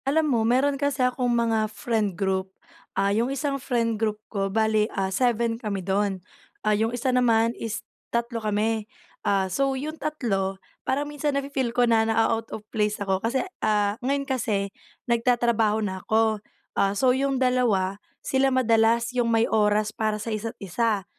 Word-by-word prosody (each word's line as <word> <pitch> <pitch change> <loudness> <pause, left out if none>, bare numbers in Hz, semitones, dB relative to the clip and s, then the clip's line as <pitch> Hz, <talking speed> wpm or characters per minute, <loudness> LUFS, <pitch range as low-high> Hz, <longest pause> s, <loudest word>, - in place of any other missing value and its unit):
Alam 310 +4 +2
mo, 230 - +2
meron 265 +5 +2
kasi 285 -2 +1
akong 250 0 0
mga 225 -2 +1
friend 215 -4 -1
group. 190 -1 0 0.5
Ah, 200 +1 +2
yung 230 +4 +1
isang 275 0 -2
friend 230 -4 0
group 215 -1 0 0.2
ko, 195 -1 0
bale 220 +1 +2
ah, 190 0 0
7 235 0 +1
kami 200 -4 -3
do'n. 195 0 +1 0.5
Ah, 215 - +4
yung 220 +2 +1
isa 245 +2 -1
naman, 230 -2 +3
is 225 -3 -5 0.2
3 235 0 -2
kami. 215 +1 0 0.3
Ah, 195 -1 +1
so 270 +8 0
yung 310 +4 -5
3, 195 -11 -1 0.2
parang 280 +3 -1
minsan 295 -1 -2
nafe-feel 275 -3 -1
ko 245 +1 +2
na 230 -2 +4
naa-out 225 0 +1
of 215 - -7
place 210 -1 +1
ako 195 -1 -1
kasi, 260 +8 0 0.2
ah, 210 -1 +2
ngayon 275 +2 0
kasi 215 -7 -1 0.3
nagtatrabaho 235 -3 +2
na 190 -1 -4
ako. 220 0 +1 0.3
Ah, 200 +1 +1
so 255 +1 +4
yung 270 +1 0
dalawa, 225 -7 +1 0.2
sila 270 0 +2
madalas 235 -1 +3
yung 245 -2 +1
may 225 0 +3
oras 210 0 +2
para 215 -1 -1
sa 220 +1 -4
isa't 225 +1 -4
isa. 205 +1 -1
225 Hz, 165 wpm, -25 LUFS, 210-250 Hz, 0.5 s, Ah